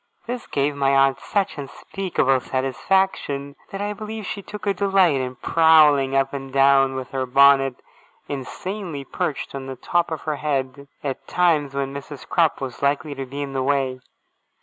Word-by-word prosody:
This 245 0 -5
gave 140 +1 0
my 140 -1 +2
aunt 135 0 +4
such 200 -6 -1
unspeakable 140 -1 -1
satisfaction, 140 +2 -1
that 195 - -5
I 205 0 -2
believe 215 +1 -6
she 200 - -4
took 205 0 -9
a 200 - +2
delight 190 -7 +3
in 130 0 -4
prowling 150 -3 +4
up 135 0 +1
and 135 -1 -6
down, 135 0 +4
with 130 -1 -5
her 130 -1 -2
bonnet 135 0 +5 0.5
insanely 160 +3 -5
perched 140 +1 -3
on 135 -1 -6
the 135 - -5
top 175 +7 0
of 160 -3 -4
her 155 -2 -3
head, 140 -2 -2 0.2
at 135 -2 -4
times 155 -6 +2
when 135 0 -2
Mrs. 140 0 -8
Crupp 165 -3 +2
was 130 -3 -6
likely 145 +1 0
to 135 -1 -6
be 140 +3 -4
in 140 -1 -6
the 135 - -1
way. 135 -1 0
140 Hz, 170 wpm, -22 LUFS, 135-170 Hz, 0.5 s, bonnet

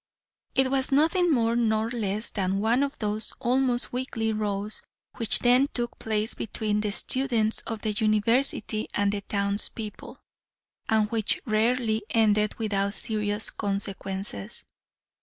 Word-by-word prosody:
It 265 0 +3
was 270 0 +1
nothing 325 +5 +3
more 230 -4 +2
nor 225 -1 +1
less 215 -2 -2
than 190 -1 -1
one 230 +5 +2
of 280 0 -2
those 215 0 -1
almost 250 0 +1
weekly 230 -3 -2
rows 210 0 -2 0.4
which 230 -2 +3
then 250 +3 +4
took 240 -1 -3
place 220 0 0
between 210 -1 -2
the 210 - -1
students 230 -1 +2
of 225 -2 -4
the 215 - 0
University 215 +2 +1
and 205 -1 +2
the 205 0 -3
town's 200 0 +1
people, 225 +3 -9 0.7
and 220 -1 +3
which 220 -2 0
rarely 225 0 +1
ended 210 -2 +2
without 200 -2 -1
serious 210 -2 +2
consequences. 195 - -2
220 Hz, 135 wpm, -26 LUFS, 210-240 Hz, 0.7 s, then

